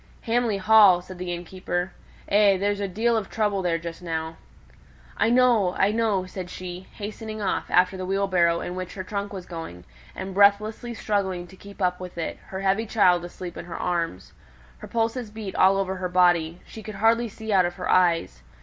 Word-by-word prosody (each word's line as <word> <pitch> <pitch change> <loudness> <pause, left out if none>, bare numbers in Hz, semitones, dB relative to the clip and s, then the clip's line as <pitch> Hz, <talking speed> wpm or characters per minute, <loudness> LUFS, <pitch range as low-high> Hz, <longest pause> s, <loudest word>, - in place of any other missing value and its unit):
"Hamley 230 -3 0
Hall!" 200 -2 +6
said 185 0 -11
the 180 -1 -4
innkeeper. 175 +1 -3 0.4
"Eh! 200 -1 +4
there's 205 +1 0
a 200 - -1
deal 230 +5 +1
o' 220 - +1
trouble 205 -1 -1
there 175 -2 0
just 165 +1 -7
now." 160 -1 -4 0.8
"I 225 - +2
know, 235 -7 +3
I 195 - +3
know," 215 -4 +1
said 185 -1 -7
she, 180 0 -8
hastening 215 +1 -6
off 205 - -2
after 185 +1 +3
the 185 - -4
wheelbarrow 185 -3 +2
in 175 - -5
which 185 0 -6
her 190 - -5
trunk 200 +1 -4
was 190 -3 -7
going, 165 - -8 0.3
and 190 0 -6
breathlessly 210 +4 +3
struggling 190 -5 -1
to 190 - -15
keep 200 +1 -8
up 180 0 +1
with 180 -1 -9
it, 165 - -4
her 190 0 -6
heavy 195 +3 +1
child 180 -5 +3
asleep 175 0 -8
in - - -7
her 170 - -7
arms. 170 - -3 0.5
Her - - -9
pulses 230 0 -1
beat 210 -2 -7
all 190 +1 +5
over 190 -1 -1
her 180 0 -3
body; 175 -2 +2
she 220 - -10
could 215 -1 -8
hardly 225 +3 +2
see 220 +1 -5
out 185 -2 +5
of 175 0 -3
her 180 - -5
eyes. 170 - +2
190 Hz, 195 wpm, -25 LUFS, 180-210 Hz, 0.8 s, Hall